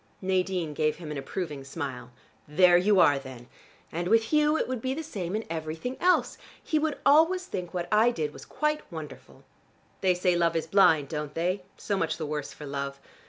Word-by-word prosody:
Nadine 185 -4 -1
gave 155 0 +1
him 160 -3 -8
an 150 - -4
approving 150 -2 -5
smile. 135 -4 -6 0.4
"There 175 +4 +5
you 190 +2 +4
are 145 -4 +5
then! 130 -3 -10 0.5
And 170 +2 -3
with 225 +3 +4
Hugh 300 +1 +4
it - - -1
would 255 -2 -3
be 260 +2 -2
the 320 - -4
same 200 - -4
in 220 - -3
everything 160 +9 -4
else. 360 +1 +2 0.2
He 310 - +1
would 305 -1 -1
always 325 +6 +5
think 180 - -5
what 175 -1 -3
I 215 +3 +5
did 155 -11 -3
was - - -11
quite 300 0 -1
wonderful. 155 -4 -10 0.6
They 185 -2 +3
say 180 0 +2
love 170 -1 +2
is 165 - 0
blind, 160 -7 +4
don't 150 -1 -5
they? 180 +4 0 0.2
So 200 - -2
much 160 -3 -1
the 160 - -4
worse 150 -1 -4
for 150 - -10
love. 140 0 -4
175 Hz, 200 wpm, -27 LUFS, 150-215 Hz, 0.6 s, There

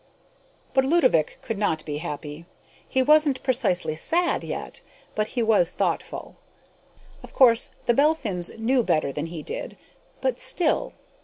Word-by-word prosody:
But 265 - +4
Ludovick 265 - +2
could 225 -3 -4
not 160 -7 -1
be 145 -1 -4
happy. 150 0 -7 0.4
He 260 -1 +2
wasn't 300 -2 +3
precisely 215 - 0
sad 345 - +1
yet, - - -6 0.3
but 215 0 -1
he 235 - +2
was 205 -6 +3
thoughtful. - - -3 0.8
Of - - -13
course 240 -3 +5 0.2
the 240 - +3
Belphins 235 - +2
knew 245 +3 +2
better 155 -10 0
than 150 +3 -4
he 165 -2 -7
did, - - -6 0.4
but - - -1
still.... 340 -4 0
225 Hz, 140 wpm, -24 LUFS, 165-265 Hz, 0.8 s, course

